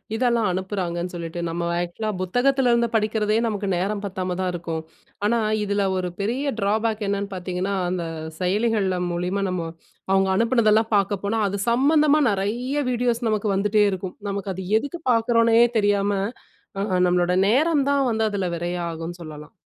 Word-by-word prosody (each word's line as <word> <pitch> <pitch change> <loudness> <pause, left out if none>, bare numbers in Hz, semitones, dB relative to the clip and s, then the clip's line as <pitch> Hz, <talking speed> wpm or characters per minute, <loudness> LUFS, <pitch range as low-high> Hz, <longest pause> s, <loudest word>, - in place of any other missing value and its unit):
இதெல்லாம் 235 -2 +2
அனுப்புறாங்கன்னு 180 -2 -3
சொல்லிட்டு, 170 0 -5
நம்ம 170 +1 -3 0.2
ஆக்ஷூலா 175 +5 -3
புத்தகத்தில 245 +6 +2
இருந்து 235 0 +3
படிக்கிறதே 215 0 +1
நமக்கு 205 -2 -2
நேரம் 200 +3 -1
பத்தாம 185 -2 -3
தான் 185 -1 0
இருக்கும். 165 -2 -4 0.4
ஆனா 235 +2 +2 0.2
இதில 200 -1 0
ஒரு 180 -1 -2
பெரிய 245 +8 -1
டிராபேக் 215 +2 0
என்னன்னு 200 0 -1
பார்த்தீங்கன்னா 185 +2 -3 0.2
அந்த 180 -1 -2 0.4
செயலிகள்ல 195 0 +1
மூலியமா 180 +3 -1
நம்ம 175 -2 -2 0.4
அவுங்க 195 0 +3
அனுப்பினதெல்லாம் 225 -1 +3
பார்க்க 200 0 +1
போனா, 215 +3 0
அது 200 - -3
சம்மந்தமா 295 +4 +4
நிறைய 225 +8 -2
வீடியோஸ் 240 -1 0
நமக்கு 215 0 0
வந்துட்டே 210 +2 +3
இருக்கும். 185 -1 -5
நமக்கு 200 -1 -3
அது 190 - -5 0.2
எதுக்கு 285 +7 -6
பார்க்குறோன்னே 230 0 +3 0.2
தெரியாம 205 -1 +2 0.7
அ - - 0 0.2
நம்மளோட 180 0 +2
நேரம் 285 +5 +3
தான் 280 -1 +2
வந்து 220 0 0
அதில 195 -2 -1
விரையம் 175 0 -3
ஆகுன்னு 165 +1 -6
சொல்லலாம். 150 -1 -10
200 Hz, 150 wpm, -23 LUFS, 180-230 Hz, 0.7 s, சம்மந்தமா